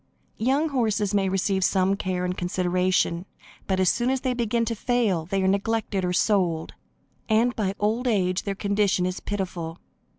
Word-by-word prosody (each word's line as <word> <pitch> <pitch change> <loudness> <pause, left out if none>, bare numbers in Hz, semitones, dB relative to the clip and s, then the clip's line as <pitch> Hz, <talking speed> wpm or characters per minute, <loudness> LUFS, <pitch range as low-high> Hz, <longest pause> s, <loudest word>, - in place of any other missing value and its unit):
Young 275 +7 +2
horses 215 -6 0
may 195 -2 +2
receive 190 0 0
some 190 +1 +2
care 185 -2 -2
and 180 0 -2
consideration, 180 0 0 0.4
but, 190 -1 0
as 185 - +3
soon 240 +1 +1
as 265 -1 0
they 255 -2 0
begin 235 -1 0
to 230 - -1
fail, 215 -8 0
they 195 +1 0
are - - +2
neglected 200 0 0
or 180 - 0
sold, 180 -4 +1 0.6
and 230 +3 +3
by 200 -4 -1
old 225 +5 0
age 185 -5 +1
their 200 -1 -3
condition 200 -2 +1
is 185 0 -2
pitiful. 180 -5 -4
195 Hz, 170 wpm, -25 LUFS, 185-225 Hz, 0.6 s, as